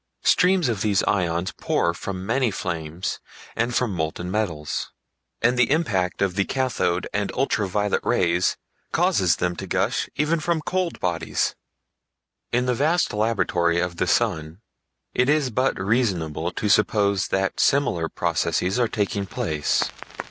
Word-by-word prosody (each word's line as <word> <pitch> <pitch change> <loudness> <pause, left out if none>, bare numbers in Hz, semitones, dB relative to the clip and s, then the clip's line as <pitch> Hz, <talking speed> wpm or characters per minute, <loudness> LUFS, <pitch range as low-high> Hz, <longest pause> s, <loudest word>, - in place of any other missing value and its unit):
Streams 180 -3 +4
of 110 -5 -1
these 100 -3 +2
"ions" 90 -2 0
pour 85 - 0
from 95 +1 -5
many 120 +3 +1
flames 85 -3 -4 0.4
and 120 +1 0
from 120 -5 +1
molten 85 +1 -3
metals; 90 -8 -2 0.5
and 125 +2 +3
the 120 - +4
impact 100 - +1
of 95 -2 0
the 100 +1 +1
cathode 110 -9 -1
and 105 -1 -1
ultra 120 -6 +1
violet 105 +2 0
rays 90 0 +2 0.3
causes 90 -4 +3
them 90 +2 -1
to - - -6
gush - - 0
even 155 +3 +1
from 165 +1 0
cold 185 +2 -2
bodies. 85 -2 -1 1.0
In 125 +1 +1
the 125 - +1
vast 155 +7 +1
laboratory 90 -6 +1
of 85 -1 -2
the 90 - 0
sun 85 -5 0 0.5
it 125 +2 +2
is 150 -4 +2
but 130 +1 0
reasonable 95 -7 0
to 105 - -2
suppose 100 -2 +3
that 95 0 -1
similar 90 -13 +2
processes 95 +6 0
are 120 - +3
taking 100 -2 -2
place. 75 -5 0
100 Hz, 145 wpm, -24 LUFS, 90-125 Hz, 1.0 s, Streams